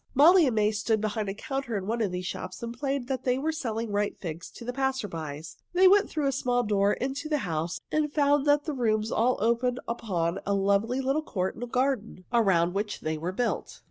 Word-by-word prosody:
Molly 325 +4 +7
and 245 - 0
May 210 0 +3
stood 215 +1 0
behind 215 0 -2
the 195 - -3
counter 265 0 -3
in 190 - -4
one 230 +3 -1
of 205 -4 0
these 180 0 -4
shops 185 +5 -6
and 235 0 -5
played 275 0 -2
they 255 -1 0
were 305 +4 0
selling 230 -7 -3
ripe 205 0 -1
figs 170 -1 -6
to 235 - -11
the 245 - -3
passers 265 -6 -1
by. 155 -2 -5 0.3
They 370 +1 +6
went 400 +2 +5
through 305 -2 -1
a 275 - +2
small 245 -2 0
door 205 -2 +2
into 270 +4 -3
the 300 - +2
house 165 - -3
and 305 -1 +1
found 290 -1 +2
that 290 0 +4
the 310 - -2
rooms 220 -4 0
all 245 +3 +2
opened 235 +3 +1
upon 185 -7 -1
a 200 - 0
lovely 200 +6 +1
little 270 +4 +1
court 190 -10 -2
and 240 0 -7
garden, 250 -8 -1
around 180 -7 +3
which 205 +1 -3
they 155 0 -2
were 170 +3 -2
built. 240 +6 -2
230 Hz, 220 wpm, -28 LUFS, 200-270 Hz, 0.3 s, Molly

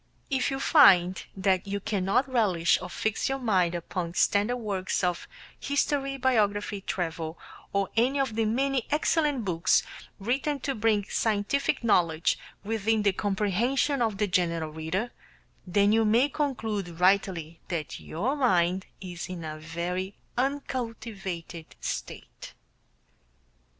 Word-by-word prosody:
If 265 -2 +1
you 270 -1 -3
find 190 - +5
that 190 -1 +1
you 200 +1 -2
cannot 200 +6 0
relish 200 -10 +2
or - - -6
fix 220 +6 -1
your 270 - 0
mind 190 -9 +1
upon 170 0 -4
standard 210 +5 +2
works 200 -5 -2
of 180 -1 -1 0.3
history 280 -1 0
biography, 210 -5 +1
travel, 165 -3 -3 0.3
or 200 -1 +1
any 255 +5 +2
of 265 -5 0
the 225 0 +1
many 260 +3 0
excellent 295 -4 +1
books 170 -2 +2 0.3
written 270 +7 -1
to 275 - -1
bring 215 -3 +2
scientific 220 +5 0
knowledge 170 -7 +2 0.2
within 220 0 0
the 200 -2 +3
comprehension 220 +8 0
of 220 -4 0
the 210 - +2
general 170 -4 0
reader, 160 +9 -3 0.6
then 200 +3 +3
you 225 +1 +4
may 230 +6 +4
conclude 220 - -3
rightly 180 -4 +2
that 165 -4 -4
your 225 - -2
mind 185 -8 +2
is 175 -1 -6
in 180 -2 -6
a 155 -1 -6
very 175 +4 -4 0.2
uncultivated 225 - -4
state. - - -6
205 Hz, 130 wpm, -27 LUFS, 180-245 Hz, 0.6 s, find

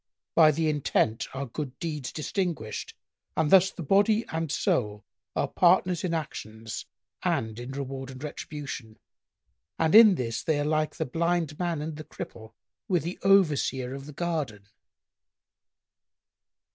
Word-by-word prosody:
By 160 -2 +7
the 160 +1 +1
intent 140 -6 +1
are 140 +1 -2
good 135 +1 -6
deeds 150 -6 -4
distinguished 155 - -3 0.4
and 155 -2 +2
thus 190 0 +7
the 175 - -7
body 205 +7 +3
and 160 -2 -2
soul 105 -6 0 0.3
are - - +1
partners 180 -1 +3
in 180 - -1
actions 115 -8 -5 0.3
and 110 0 -1
in 125 +2 -6
reward 135 -1 -5
and 130 +1 -9
retribution, 145 -6 -6 0.8
and 160 -1 +2
in 215 -3 +9
this 115 -6 -2
they 155 -2 0
are 145 - 0
like 155 0 0
the - - -2
Blind 165 +1 -1
man 170 -4 -1
and 155 -1 -5
the 155 - -7
Cripple 110 -6 -9 0.3
with 175 -6 +1
the 175 +3 -5
Overseer 150 -9 +3
of 135 +1 -8
the 150 - -9
garden." 140 - -3
150 Hz, 145 wpm, -27 LUFS, 130-170 Hz, 0.8 s, in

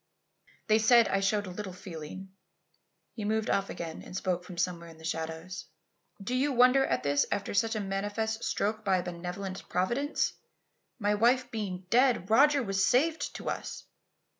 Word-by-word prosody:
"They 215 0 +4
said 230 0 +6
I 195 - +2
showed 205 +1 +1
little 190 +1 -6
feeling." 180 +1 -8 0.8
He 225 - -7
had 205 - -2
moved 220 0 0
off 195 0 +1
again 165 -2 -6
and 180 - -7
spoke 180 -2 -1
from 180 -1 -10
somewhere 170 -1 -2
in 165 - -14
the 160 - -15
shadows. 160 +3 -4 0.5
"Do 200 +5 -4
you 270 +3 +1
wonder 250 +2 +6
at - - 0
this 145 0 +2
after 200 - -2
such 225 +2 +1
a - - -1
manifest 205 +3 -2
stroke 215 +2 -1
by 195 -2 +3
a 180 - -2
benevolent 180 +2 -6
Providence? 240 - 0 0.6
My 210 -3 +1
wife 245 +4 +3
being 190 -5 -4
dead, 240 -5 +3
Roger 280 +3 +5
was 195 -2 0
saved 305 +9 +2
to - - -7
us! - - -4
200 Hz, 170 wpm, -30 LUFS, 180-230 Hz, 0.8 s, said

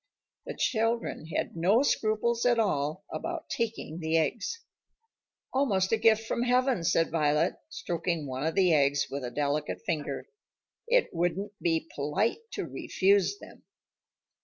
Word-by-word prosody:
The - - -5
children 225 - 0
had 165 - -3
no 195 +10 +3
scruples 230 -2 +1
at 245 -1 +4
all 185 -4 0
about 340 -1 -5
taking 225 -8 -3
the 160 0 +1
eggs. 235 - -1 0.9
"Almost 205 -9 +1
a 225 - +4
gift 220 0 +4
from 235 - -1
heaven," 250 -4 +2
said 165 0 +2
Violet, 155 +1 +2
stroking 170 -2 -2
one 130 0 -4
of 160 +1 -1
the 185 -3 +4
eggs 140 -2 +2
with 140 0 -4
a 125 - -3
delicate 145 - -2
finger. 160 -7 -2 0.6
"It - - +2
wouldn't 180 +4 -1
be 165 -1 0
polite 185 - 0
to - - -3
refuse 200 - +1
them." - - -14
185 Hz, 140 wpm, -29 LUFS, 155-230 Hz, 0.9 s, at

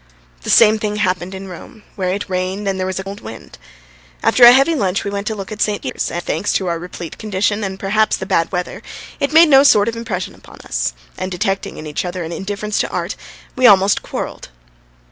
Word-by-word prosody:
The - - -7
same 220 -1 +6
thing 210 -1 -2
happened 185 -2 -1
in 190 0 -8
Rome, 210 +5 -11
where 185 -3 -2
it 200 +2 -3
rained 185 +2 -3
and 190 -1 -1
there 185 - -1
was 190 - -3
a - - -4
cold 200 +1 -8
wind. 110 - -11 0.6
After 250 - +4
a 240 - +12
heavy 275 +6 +4
lunch 195 - 0
we 200 - -3
went 200 +1 -4
to 220 - -1
look 195 0 -7
at 210 -1 -6
St. 210 -1 0
Peter's, - - -3
and 175 - -4
thanks 205 - -1
to 190 - 0
our 170 -2 -2
replete 175 -1 -8
condition 210 0 -1
and 190 -1 -4
perhaps 215 +3 +1
the 190 - -5
bad 175 -4 +1
weather, 180 -1 -4 0.4
it 280 - 0
made 325 +1 +7
no 270 -2 +7
sort 210 -7 +5
of 230 - -2
impression 210 -5 -4
on - - -14
us, - - -1 0.3
and 185 - -3
detecting 195 +2 -2
in 155 - -8
each 150 -1 -3
other 180 0 -4
an 165 - -6
indifference 205 +3 -3
to - - 0
art, - - -3 0.4
we 255 -1 +5
almost 195 -1 +5
quarrelled. - - -6
195 Hz, 225 wpm, -18 LUFS, 185-215 Hz, 0.6 s, a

